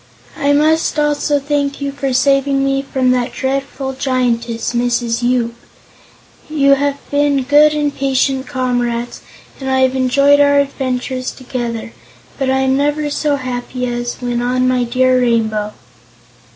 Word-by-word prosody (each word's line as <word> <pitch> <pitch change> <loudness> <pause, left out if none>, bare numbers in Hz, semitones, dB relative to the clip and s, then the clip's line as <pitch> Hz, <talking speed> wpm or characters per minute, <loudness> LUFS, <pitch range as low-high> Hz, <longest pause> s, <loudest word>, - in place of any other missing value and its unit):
I 285 0 +1
must 310 +2 +2
also 295 0 +1
thank 285 0 -2
you 280 -1 -3
for 275 -1 -3
saving 275 +1 +2
me 275 0 +1
from 265 -2 0
that 250 0 0
dreadful 270 0 -3
Giantess, 245 -3 -1
Mrs. 240 -1 0
Yoop. 240 -1 0 1.0
You 280 -2 +3
have 280 0 0
been 285 -1 +2
good 295 +3 +4
and 295 -1 -1
patient 270 0 0
comrades 245 -3 -2 0.4
and 265 -1 -4
I 265 0 +2
have 260 0 +2
enjoyed 275 +2 +3
our 285 0 +4
adventures 260 -2 -2
together, 240 -3 -5 0.5
but 270 -1 0
I 265 0 +2
am 265 0 +2
never 295 +1 0
so 290 0 0
happy 250 -1 -4
as 240 0 -3
when 245 -1 -3
on 255 +1 +1
my 250 -1 +1
dear 255 +1 +2
Rainbow." 220 -3 0
265 Hz, 145 wpm, -16 LUFS, 245-280 Hz, 1.0 s, good